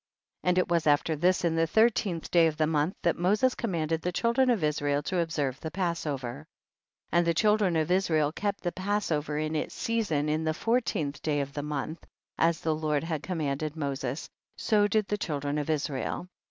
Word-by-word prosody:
15. - - 0
And 180 - +2
it 185 - +3
was 170 -2 +1
after 150 +2 +3
this, 180 +3 +2
in 165 -1 +1
the 165 0 +2
thirteenth 210 -4 +2
day 170 -2 +6
of 155 -1 -3
the 155 - +3
month, 155 +3 0
that 170 - +1
Moses 210 +8 +3
commanded 165 -7 -1
the 180 - -1
children 235 +7 +2
of 225 -9 +2
Israel 145 -1 0
to 180 +4 -1
observe 145 -6 -1
the 160 - -5
Passover. 155 -8 -2
1 - - -13
6. - - -30 0.6
And 175 0 +3
the 170 - +3
children 210 -2 +3
of 160 +1 +1
Israel 160 -6 +2
kept 200 +4 -2
the 175 - -1
Passover 185 -7 -1
in 155 +1 -1
its 150 - -3
season 205 -11 0
in 155 +1 0
the 155 0 0
four 235 +7 +2
teenth 145 -10 -3
day 150 -2 0
of 140 0 -3
the 145 - -3
month, 150 +2 -4 0.4
as 165 0 +2
the 160 - +1
Lord 155 -1 0
had 160 -3 -3
commanded 155 -3 -2
Moses, 140 -1 -3 0.3
so 210 -2 +3
did 210 0 +1
the 210 +1 -2
children 145 -4 -2
of 150 - -4
Israel. 150 +2 -2
160 Hz, 205 wpm, -28 LUFS, 150-185 Hz, 0.6 s, day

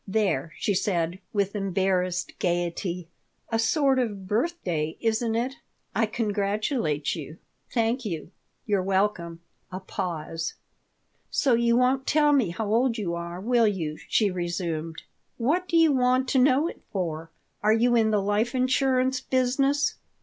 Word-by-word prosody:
There!" 190 -8 0
she 205 - 0
said, 180 -2 0
with 200 -1 0
embarrassed 185 -2 0
gaiety. 175 0 -1 0.4
"A 225 - +1
sort 270 +3 +3
of 205 -6 -2
birthday, 195 - -1
isn't 225 0 0
it? 245 +3 -1 0.4
I 225 +2 +2
congratulate 205 - -1
you." 155 -1 -7 0.3
"Thank 235 +2 0
you." 170 -5 -5 0.3
"You're 205 -3 +1
welcome." 190 -3 0 0.3
A 185 - -4
pause 165 -4 -4 0.7
"So 270 -4 +2
you 235 0 +3
won't 260 +1 +2
tell 295 -1 +4
me 255 -10 +3
how 215 +6 -3
old 240 +1 +2
you 185 -6 -2
are, 170 +1 -5
will 235 +2 +3
you?" 165 -7 -2
she 210 -3 +3
resumed 170 -3 -3 0.3
"What 315 +10 +1
do 335 - +2
you 325 -2 +6
want 255 0 +2
to 265 - +3
know 275 +4 +4
it - - -8
for? 165 -4 -3 0.3
Are 215 - +3
you 240 +2 +3
in 225 -2 +4
the 210 -2 +1
life 210 +5 0
insurance 260 0 +2
business?" 270 +3 +1
210 Hz, 145 wpm, -26 LUFS, 180-250 Hz, 0.7 s, you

